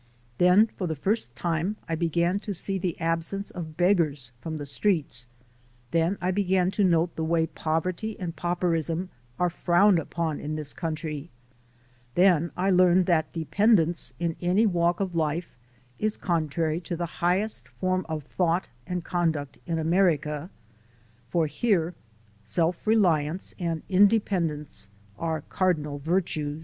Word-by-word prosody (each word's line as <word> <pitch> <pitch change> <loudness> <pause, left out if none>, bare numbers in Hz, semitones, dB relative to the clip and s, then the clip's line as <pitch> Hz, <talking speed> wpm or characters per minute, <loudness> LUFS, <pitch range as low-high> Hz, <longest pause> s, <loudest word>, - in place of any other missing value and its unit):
Then 180 +4 +6
for 195 -4 -5
the 160 - -2
first 190 - -1
time 170 - -1
I 165 - -2
began 170 +3 +1
to 205 -1 -5
sec 190 +2 -3
the 175 -3 -2
absence 165 +4 -1
of 160 -3 -7
beggars 160 - +2
from 160 -1 -4
the 145 - -5
streets; 140 - -1 0.6
then 170 +4 +1
I 180 +1 0
began 185 -1 +2
to 205 +1 +1
note 170 -2 +2
the 160 - -2
way 165 0 +2
poverty 170 +7 -2
and 175 -3 -4
pauperism 175 +1 -1 0.3
are 180 -1 +1
frowned 175 +2 +4
upon 160 -1 -3
in 150 +1 -4
this 150 -2 -5
country; 160 -2 -4 0.9
then 175 -3 +4
I 190 +2 +2
learned 180 0 +5
that 165 -3 +1
dependence 170 - +2
in 170 -1 -1
any 185 +5 +3
walk 175 -3 +2
of 190 -3 -2
life 160 +1 -1 0.4
is 215 0 0
contrary 160 -1 -1
to 170 0 -4
the 170 -1 -5
highest 180 - +1
form 185 +9 -1
of 155 -2 -3
thought 175 +4 0 0.2
and 180 -1 -3
conduct 160 -6 -1
in 165 -1 -1
America; 160 -2 +1 0.8
for 165 +4 +2
here 170 - +1 0.5
self 165 - -1
reliance 175 -6 +2
and 165 -3 -2
independence 180 - +1 0.3
are 160 -2 -1
cardinal 150 -5 -1
virtues. 155 -2 -1
170 Hz, 140 wpm, -26 LUFS, 160-185 Hz, 0.9 s, Then